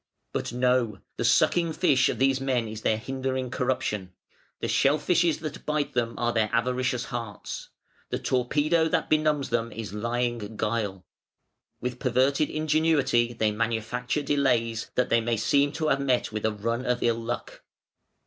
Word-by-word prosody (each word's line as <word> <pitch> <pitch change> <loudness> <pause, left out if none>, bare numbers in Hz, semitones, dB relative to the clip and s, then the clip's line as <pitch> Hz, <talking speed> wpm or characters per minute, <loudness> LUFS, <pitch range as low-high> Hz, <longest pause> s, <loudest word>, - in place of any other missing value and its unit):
"But - - -2
no. 125 -4 +1 0.2
The - - -1
sucking 170 -2 +3
fish 145 -6 +3
of - - -2
these 135 0 +2
men 125 -4 0
is 110 0 -7
their 110 - +2
hindering 130 +2 -3
corruption. 105 -8 -2 0.5
The - - -2
shell 140 +2 +3
fishes 170 -1 +2
that 155 -2 -6
bite 150 -1 -1
them 115 -1 -1
are 120 0 0
their 110 -2 +1
avaricious 125 +1 0
hearts. 115 -4 -5 0.4
The - - -1
torpedo 150 +6 +1
that - - -1
benumbs 155 -2 +2
them 115 0 0
is 110 -3 -6
lying 115 -1 -2
guile. 105 -4 -2 0.8
With 125 0 -3
perverted 135 +4 +2
ingenuity 155 -6 +2
they 110 -2 +1
manufacture 115 +5 -1
delays, 120 -6 +1
that 125 - +1
they 115 - +3
may 115 0 0
seem 140 +6 +2
to 155 -1 -1
have 140 - +2
met 130 -5 +1
with 110 0 -3
a - - 0
run 115 +4 -2
of 125 -1 0
ill 115 -1 +1
luck. 120 +1 -5
125 Hz, 160 wpm, -27 LUFS, 115-140 Hz, 0.8 s, sucking